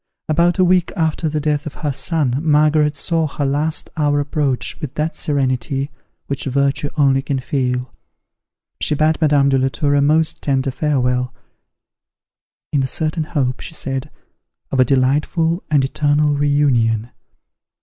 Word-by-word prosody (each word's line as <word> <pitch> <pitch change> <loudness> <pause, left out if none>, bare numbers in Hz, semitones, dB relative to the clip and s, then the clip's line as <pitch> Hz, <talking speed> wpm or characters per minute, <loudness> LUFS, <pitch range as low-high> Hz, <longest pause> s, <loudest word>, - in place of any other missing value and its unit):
About 170 +3 +2
a 185 - +4
week 180 -1 +2
after 160 -1 0
the 155 0 -1
death 150 +1 -1
of 145 - -7
her 145 - 0
son, 140 -4 0
Margaret 150 -1 +3
saw 160 +2 0
her 145 0 -3
last 150 +3 -1
hour 145 -2 +1
approach 145 0 -2
with 150 -3 -6
that 155 +2 -1
serenity 135 0 -1 0.3
which 140 - -4
virtue 140 +1 0
only 135 -2 +3
can 140 0 -2
feel. 125 -1 -2 0.9
She 150 - 0
bade 155 +2 +1
Madame 145 -3 +4
de 135 -1 +2
la 130 - +2
Tour 145 +2 0
a 145 - +3
most 155 +2 +2
tender 135 -1 0
farewell, 125 -3 0 1.4
"in 145 - +3
the 135 - 0
certain 155 +4 -2
hope," 140 -6 -1
she 160 - -9
said, 135 0 -4 0.6
"of 135 - 0
a 130 - +6
delightful 150 - +1
and 145 -3 +3
eternal 145 +1 +1
re 145 0 +1
union. 120 -6 +1
145 Hz, 155 wpm, -19 LUFS, 135-155 Hz, 1.4 s, a